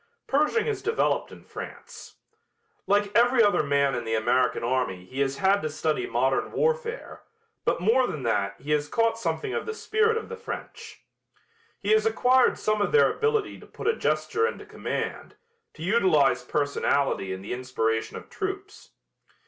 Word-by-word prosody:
Pershing 300 +11 +1
has 425 -3 -2
developed 450 0 0
in - - -13
France. - - -10 0.7
Like 205 0 +1
every 240 +1 +5
other 205 -5 +3
man 140 -1 +1
in 120 - -2
the 115 0 -1
American 120 +2 +1
army 120 -8 -1
he 130 +8 -8
has 140 0 0
had 195 +4 +3
to 155 - -2
study 155 -3 -1
modern 130 +3 0
warfare, 475 0 -2 0.4
but - - +1
more 240 +6 +3
than 145 - -5
that 100 -4 -1
he 145 +4 -6
has 150 -1 +1
caught 230 +6 +1
something 400 - -2
of - - -3
the 445 - -3
spirit 445 +1 +1
of 455 - -5
the 470 - -6
French. 460 0 -8 0.8
He - - -1
has 435 0 +4
acquired 260 - +3
some 215 -1 0
of - - 0
their 460 - +5
ability 445 -2 -1
to - - -15
put - - -7
a 455 - +3
gesture 445 +1 0
into - - -6
command, - - -5 0.4
to - - -9
utilize 175 - +3
personality 140 -6 0
in 95 0 -6
the 100 - -4
inspiration 115 -3 -2
of - - -11
troops. 395 +1 -6
195 Hz, 170 wpm, -26 LUFS, -, 0.8 s, every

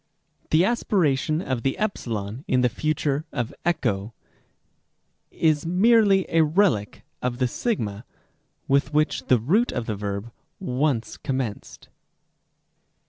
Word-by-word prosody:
The 160 +3 +4
aspiration 160 - +1
of 130 -7 -2
the 135 +1 -1
ε 215 - +3 0.6
in 125 - +2
the 125 - +3
future 150 +3 -1
of 120 -4 -3
ἔχω 110 - -1 1.2
is 155 -2 +1
merely 200 +1 +4
a 165 -1 +4
relic 155 - +1 0.2
of 125 -1 -2
the 130 - +1
σ 235 - -1 0.9
with 140 +2 +1
which 155 +1 +1
the 125 - +5
root 185 - +2
of 115 - -3
the 110 - -2
verb 100 +2 -4 0.3
once 130 -2 -1
commenced. 130 -6 -5
145 Hz, 120 wpm, -24 LUFS, 120-175 Hz, 1.2 s, the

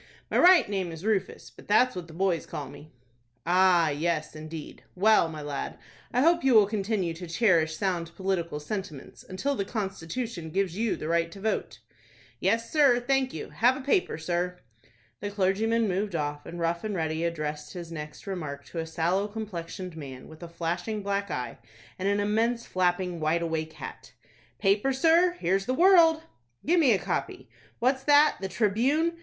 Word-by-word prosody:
"My - - +2
right 360 -1 +7
name 190 -4 -2
is 165 +4 -9
Rufus; 200 -4 -1
but - - -16
that's 245 +4 +4
what 180 -2 -6
the - - -12
boys 175 -1 0
call 145 - -5
me." 145 +2 -13 0.5
"Ah, 175 -2 +4
yes, 155 +1 -2
indeed. 155 0 -8
Well, 200 -2 +4
my 155 -2 -7
lad, 145 -1 -4 0.3
I 250 - +2
hope 340 +3 +4
you 265 -3 +4
will 215 -2 +8
continue 200 -4 -1
to 175 +2 -8
cherish 165 -4 +2
sound 175 -3 -1
political 175 -5 -2
sentiments 155 -3 -7
until 195 +10 -2
the 200 - -1
constitution 195 -2 -4
gives 185 0 -1
you 225 +1 0
the 155 - -6
right 170 0 +1
to 195 - -11
vote." 220 +2 -2 0.6
"Yes, 230 +4 0
sir, 280 -6 +5
thank 265 +1 +1
you.—Have 225 - +1
a - - -6
paper, 285 - +1
sir?" 175 +2 -2 0.6
The 205 - -4
clergyman 210 +3 +1
moved 195 0 -1
off, 145 -1 -3
and 175 - -7
Rough 170 +2 -1
and 215 -2 -3
Ready 160 -1 -1
addressed 150 -3 -3
his 170 -2 -7
next 150 -2 -8
remark 155 -8 -5
to 170 - -5
a 160 - -3
sallow 175 +5 0
complexioned 185 -4 -6
man, 135 -5 -9
with 160 +1 -14
a 170 - -8
flashing 175 +6 -3
black 200 0 -1
eye, 125 -5 -4 0.4
and 190 +2 0
an 200 0 +1
immense 225 +3 0
flapping 180 -1 0
wide 160 +2 +1
awake 160 -1 -3
hat. - - -10 0.4
"Paper, 205 +7 +2
sir? 330 +6 +4
Here's 195 - -1
the 255 - +1
'World'!" 330 -2 +6 0.4
"Give 345 +3 +3
me 280 -7 +5
a 205 - +4
copy. - - -4 0.3
What's 260 +2 +1
that,—the 290 -8 +4
'Tribune'! 255 - +1
190 Hz, 175 wpm, -27 LUFS, 165-225 Hz, 0.6 s, will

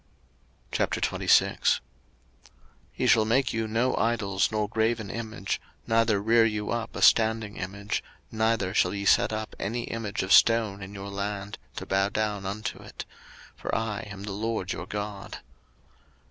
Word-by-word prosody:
03:026:001 - - +2 1.2
Ye - - -1
shall 120 -3 +5
make 120 +5 +2
you 115 -1 -1
no 115 +4 +1
idols 105 -5 +1
nor 105 -1 0
graven 110 -1 0
image, 110 -3 -4 0.2
neither 115 -2 +3
rear 115 +3 +4
you 105 -2 -1
up 115 -1 -3
a - - -1
standing 110 -2 +4
image, 100 +2 -3 0.3
neither 110 -4 +1
shall 90 -2 +2
ye 100 0 -3
set 120 +3 +4
up 110 0 -4
any 120 +3 -2
image 115 -5 -3
of 95 0 +2
stone 110 -2 +5
in 100 +1 -8
your 100 0 -6
land, 100 0 -4 0.2
to - - -5
bow 95 +1 +1
down 105 -2 -2
unto 105 +2 -4
it: - - -9 0.5
for - - -3
I 110 -2 -1
am 100 -1 -8
the 105 - -5
LORD 105 -2 -2
your - - -6
God. 105 -1 -5
110 Hz, 150 wpm, -27 LUFS, 100-115 Hz, 1.2 s, shall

